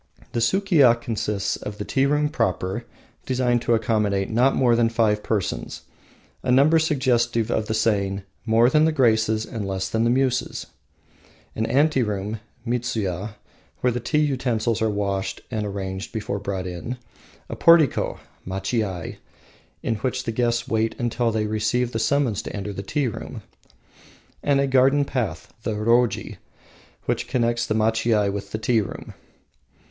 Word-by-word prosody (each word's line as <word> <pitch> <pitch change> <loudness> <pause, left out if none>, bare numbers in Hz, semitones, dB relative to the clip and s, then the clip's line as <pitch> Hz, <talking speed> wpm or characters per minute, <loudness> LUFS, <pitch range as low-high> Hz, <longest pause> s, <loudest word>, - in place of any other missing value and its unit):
The - - -1
Sukiya 145 - +4
consists 105 -4 -2
of 105 0 -7
the 105 - -5
tea 135 0 +2
room 150 +1 +2
proper, 95 - -1 0.4
designed 125 -2 +1
to 120 - +2
accommodate 105 -3 0
not 125 +4 +3
more 120 -3 +4
than 115 -1 +3
five 110 -2 +1
persons, 105 -4 -3 0.6
a 125 - 0
number 145 +6 +5
suggestive 120 -6 +1
of 105 - 0
the 110 - -1
saying 100 -3 0 0.2
"more 115 +1 +4
than 155 +4 +4
the 160 - +3
Graces 110 -5 +2
and 115 -4 -5
less 95 -1 -2
than 110 0 +1
the 115 - +3
Muses," 125 0 0 0.9
an 110 0 -1
anteroom 115 -8 +1 0.3
(midsuya) 110 -5 -2 0.5
where 125 - +3
the 125 - -2
tea 125 +6 -1
utensils 125 -6 0
are 110 - +2
washed 100 -2 -2
and 110 -3 -2
arranged 95 0 -5
before 105 -2 -3
being - - -14
brought 95 -2 -2
in, 90 +8 -5 0.5
a - - -5
portico 165 -5 +4 0.2
(machiai) 95 -1 -3 0.7
in 115 - 0
which 125 +4 -2
the 115 - -2
guests 120 0 0
wait 110 0 0
until 120 0 0
they 110 -1 0
receive 110 +3 0
the 115 - -2
summons 120 -3 +1
to - - -7
enter 100 0 -4
the 100 - -5
tea 140 +7 -1
room, 115 - -7 1.0
and 140 -1 +2
a 140 - +3
garden 135 +2 +4
path 100 - -3
(the 110 -1 -2
roji) 115 +3 +1 0.7
which - - -1
connects 120 -1 0
the 110 - 0
machiai 110 -2 +2
with 100 0 -6
the - - -2
tea 115 0 +2
room. 100 - -7
115 Hz, 155 wpm, -23 LUFS, 105-125 Hz, 1.0 s, number